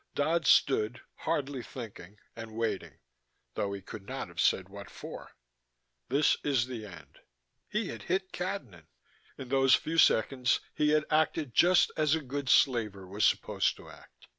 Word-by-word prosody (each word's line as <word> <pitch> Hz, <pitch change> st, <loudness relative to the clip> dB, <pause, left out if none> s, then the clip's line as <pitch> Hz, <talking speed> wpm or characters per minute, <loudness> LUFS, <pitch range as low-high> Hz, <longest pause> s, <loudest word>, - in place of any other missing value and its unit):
Dodd 155 Hz, +1 st, +1 dB
stood, 120 Hz, -3 st, +3 dB
hardly 140 Hz, -2 st, -2 dB
thinking, 105 Hz, -6 st, -10 dB, 0.2 s
and 115 Hz, -1 st, -9 dB
waiting 100 Hz, -10 st, -3 dB, 0.6 s
though 100 Hz, -, -2 dB
he 100 Hz, -1 st, -6 dB
could 100 Hz, -1 st, -10 dB
not -, -, -5 dB
have -, -, -3 dB
said 95 Hz, -, +2 dB
what 100 Hz, 0 st, -10 dB
for. -, -, -10 dB, 0.8 s
This 140 Hz, +4 st, +3 dB
is 135 Hz, -5 st, +1 dB
the 120 Hz, -4 st, -7 dB
end. 80 Hz, -7 st, -14 dB, 0.5 s
He 215 Hz, -2 st, -2 dB
had -, -, -7 dB
hit 190 Hz, 0 st, -2 dB
Cadnan: 180 Hz, -, -5 dB, 0.5 s
in 130 Hz, -2 st, -8 dB
those 135 Hz, -1 st, +5 dB
few 165 Hz, +1 st, -1 dB
seconds 125 Hz, -1 st, +3 dB
he 150 Hz, -, +1 dB
had 155 Hz, 0 st, +3 dB
acted 155 Hz, -3 st, +1 dB
just 180 Hz, +6 st, +5 dB
as 155 Hz, -1 st, +3 dB
a 160 Hz, -, -3 dB
good 135 Hz, 0 st, -4 dB
slaver 105 Hz, -7 st, +2 dB
was 100 Hz, +3 st, 0 dB
supposed -, -, +1 dB
to -, -, -13 dB
act. -, -, -18 dB
125 Hz, 160 wpm, -30 LUFS, 105-150 Hz, 0.8 s, those